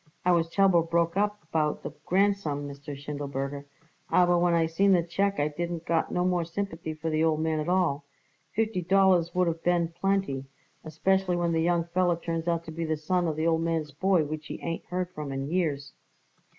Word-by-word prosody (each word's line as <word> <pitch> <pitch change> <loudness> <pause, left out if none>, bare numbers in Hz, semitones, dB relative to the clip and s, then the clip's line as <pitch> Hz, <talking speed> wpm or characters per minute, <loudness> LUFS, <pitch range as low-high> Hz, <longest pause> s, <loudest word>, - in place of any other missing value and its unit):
I 180 - +5
was 170 -1 +2
terrible 190 -1 +4
broke 170 +1 0
up 205 +1 0
about 155 -2 -1
the - - -5 0.2
grandson, 185 -7 +1
Mr. 140 0 -8
Schindelberger, 140 -1 -4 0.4
aber 175 -1 +4
when 175 0 +3
I 165 -1 +3
seen 190 +5 +3
the 175 -2 +3
check 195 +4 0
I 145 - +2
didn't 170 +2 -4
got 165 -1 0
no 180 0 0
more 180 -2 +1
sympathy 165 -2 -4
for 160 +1 -3
the 155 +1 +1
old 160 -1 +2
man 160 0 0
at 155 +3 -2
all. 170 -6 +1 0.5
Fifty 220 -3 0
dollars 180 -2 +3
would 180 -1 +3
of 165 0 -2
been 175 -1 +2
plenty, 175 -6 -1 0.4
especially 190 +3 +1
when 175 -1 0
the 165 -1 +1
young 170 0 +2
feller 175 +1 +1
turns 165 0 -4
out 170 -1 0
to 160 - -7
be 165 +1 -4
the 155 -1 -1
son 175 +3 0
of 155 - -1
the 155 +1 -1
old 165 -1 +2
man's 165 -2 -1
boy 180 +3 +2
which 155 +1 -6
he - - -6
ain't 165 -1 -4
heard 180 0 -3
from 150 -5 -6
in 135 +2 -4
years." 145 -6 -1
170 Hz, 205 wpm, -27 LUFS, 155-180 Hz, 0.5 s, I